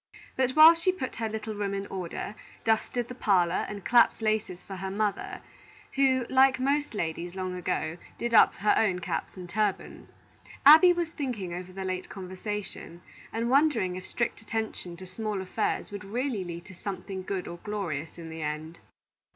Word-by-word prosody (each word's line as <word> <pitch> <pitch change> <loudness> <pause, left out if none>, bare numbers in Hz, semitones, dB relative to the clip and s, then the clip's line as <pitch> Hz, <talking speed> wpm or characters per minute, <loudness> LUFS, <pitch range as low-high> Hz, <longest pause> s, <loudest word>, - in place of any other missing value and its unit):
But 260 0 +1
while 315 +2 +10
she 335 +3 +1
put 270 -9 -5
her 225 -1 -1
little 220 0 -4
room 200 -1 -2
in 195 0 -3
order, 185 +1 -5 0.3
dusted 225 +2 +1
the 250 - -7
parlor, 185 -7 +2
and 200 -3 -7
clapped 240 -1 +5
laces 215 -5 -1
for 195 - -8
her 190 +1 -4
mother, 205 +1 -2 0.5
who, 260 -2 +3
like 265 0 +4
most 280 -1 0
ladies 170 -1 -3
long 185 -1 -3
ago, 170 -2 -2 0.2
did 235 0 -2
up 220 - +7
her 210 +1 +3
own 195 -5 +2
caps 170 +1 -4
and 180 -1 -7
turbans, 205 +2 -2 0.6
Abby 320 +5 +10
was 345 -2 0
thinking 245 - -4
over 180 +1 -6
the 190 +1 -5
late 185 0 -3
conversation, 190 -2 -6 0.3
and 230 +2 -1
wondering 265 -11 +3
if 185 0 -7
strict 240 - -2
attention 220 -6 -4
to 185 - -9
small 210 +2 -3
affairs 190 +3 -2
would 205 0 -6
really 230 0 -2
lead 170 0 -7
to 190 - -12
something 190 +1 -5
good 185 0 -4
or 170 - -6
glorious 170 -7 -4
in 165 -1 -8
the 160 0 -7
end. 155 +2 -4
200 Hz, 175 wpm, -28 LUFS, 180-235 Hz, 0.6 s, while